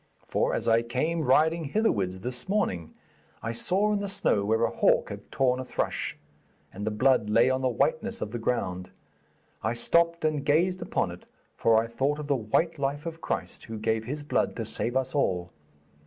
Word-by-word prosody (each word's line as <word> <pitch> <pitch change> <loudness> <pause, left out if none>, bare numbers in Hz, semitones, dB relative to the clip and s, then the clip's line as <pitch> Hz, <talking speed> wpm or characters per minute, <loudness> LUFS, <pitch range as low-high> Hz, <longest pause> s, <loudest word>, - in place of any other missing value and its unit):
For - - 0
as - - -3
I 115 0 +5
came 130 +8 -1
riding 160 +5 +3
hitherwards 100 - 0
this 125 - -3
morning, 95 - -1 0.5
I 115 - -2
saw 195 - +1
in 205 - +1
the 200 - -3
snow 195 - +1
where 110 +3 +1
a - - +2
hawk - - +3
had - - -9
torn 130 -1 +2
a - - -3
thrush, - - -2 0.6
and 100 - -6
the - - +3
blood 110 0 +2
lay 115 +4 +4
on 130 0 0
the 130 - +2
whiteness 120 - 0
of 105 - -4
the 120 - -4
ground. 90 -6 -2 0.7
I 110 +2 0
stopped 170 +7 +2
and 155 -2 0
gazed 175 +6 +2
upon - - -1
it, - - -12 0.3
for 115 -1 +4
I 110 - +3
thought 135 +6 -1
of 150 - -5
the 145 -1 +1
white 140 +8 0
life 140 +2 -2
of 165 0 -6
Christ - - -4
who 110 -1 -6
gave 110 +1 -1
His 145 +4 -4
blood 145 - 0
to 115 - -3
save 120 +3 -2
us 130 0 -1
all. 90 - 0
130 Hz, 200 wpm, -27 LUFS, 110-155 Hz, 0.7 s, I